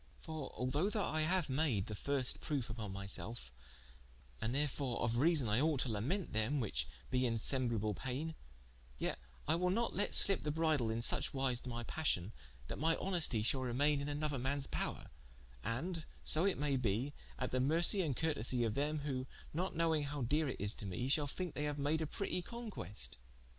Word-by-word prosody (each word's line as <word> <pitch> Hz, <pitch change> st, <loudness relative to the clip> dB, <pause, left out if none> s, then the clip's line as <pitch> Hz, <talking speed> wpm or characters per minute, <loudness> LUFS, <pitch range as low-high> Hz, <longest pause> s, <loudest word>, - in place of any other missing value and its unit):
For 155 Hz, -3 st, -5 dB
although 145 Hz, +10 st, +1 dB
that 215 Hz, -, 0 dB
I 155 Hz, 0 st, +1 dB
haue 185 Hz, +2 st, +3 dB
made 130 Hz, -8 st, +1 dB
the 110 Hz, -, -5 dB
firste 130 Hz, +4 st, 0 dB
proofe 130 Hz, -7 st, -2 dB
vpon 110 Hz, -3 st, -5 dB
my 100 Hz, +1 st, -5 dB
selfe, 100 Hz, -, -3 dB, 0.9 s
and 115 Hz, +3 st, 0 dB
therefore 140 Hz, -3 st, 0 dB
of 115 Hz, +1 st, +1 dB
reason 150 Hz, -2 st, +4 dB
I 105 Hz, +4 st, +2 dB
ought 150 Hz, -3 st, +2 dB
to 130 Hz, -, 0 dB
lamente 135 Hz, -, -1 dB
them, 110 Hz, +7 st, +1 dB
whiche 65 Hz, -, -1 dB, 0.2 s
be 125 Hz, -1 st, +3 dB
in 115 Hz, -, 0 dB
semblable 115 Hz, -4 st, +2 dB
paine, 135 Hz, -, -3 dB, 0.6 s
yet -, -, -2 dB, 0.3 s
I 155 Hz, -, +4 dB
will 180 Hz, +2 st, +2 dB
not 230 Hz, +5 st, +1 dB
let 205 Hz, -, +1 dB
slippe 195 Hz, -2 st, +7 dB
the 150 Hz, -, -2 dB
bridle 155 Hz, -6 st, +2 dB
in 115 Hz, +1 st, -1 dB
suche -, -, -1 dB
wise 130 Hz, -2 st, 0 dB
to 125 Hz, -, -6 dB
my 120 Hz, 0 st, -3 dB
passion, 115 Hz, -, 0 dB, 0.3 s
that -, -, -4 dB
mine 160 Hz, +2 st, +3 dB
honestie 170 Hz, -, 0 dB
shall 130 Hz, +3 st, +1 dB
remain 140 Hz, +4 st, +2 dB
in 145 Hz, -, -3 dB
an 145 Hz, +1 st, -2 dB
other 145 Hz, -3 st, 0 dB
man's 135 Hz, +2 st, 0 dB
power, -, -, -3 dB, 0.5 s
and 160 Hz, -, -2 dB, 0.2 s
(so 165 Hz, +5 st, +2 dB
it 195 Hz, -, +1 dB
may 140 Hz, -1 st, +1 dB
be) 125 Hz, +4 st, 0 dB, 0.2 s
at 125 Hz, -, -2 dB
the 130 Hz, -, +1 dB
mercie 165 Hz, +8 st, +5 dB
and 140 Hz, -7 st, -1 dB
curtesie 130 Hz, -6 st, +1 dB
of 110 Hz, -, 0 dB
them, 150 Hz, +4 st, 0 dB
who 130 Hz, -3 st, -2 dB, 0.3 s
not 180 Hz, +5 st, -1 dB
knowing 160 Hz, -1 st, +2 dB
howe 140 Hz, -1 st, -3 dB
dere 150 Hz, +6 st, +2 dB
it -, -, -4 dB
is 100 Hz, +2 st, +2 dB
to 100 Hz, -, -4 dB
me, 120 Hz, +8 st, -2 dB
shall 145 Hz, +1 st, +3 dB
thinke 180 Hz, +3 st, -4 dB
they 150 Hz, 0 st, -1 dB
haue 145 Hz, -, -1 dB
made 145 Hz, +3 st, +1 dB
a 160 Hz, -, 0 dB
pretie 180 Hz, +2 st, -2 dB
conquest. 215 Hz, -, -4 dB
140 Hz, 200 wpm, -37 LUFS, 120-160 Hz, 0.9 s, slippe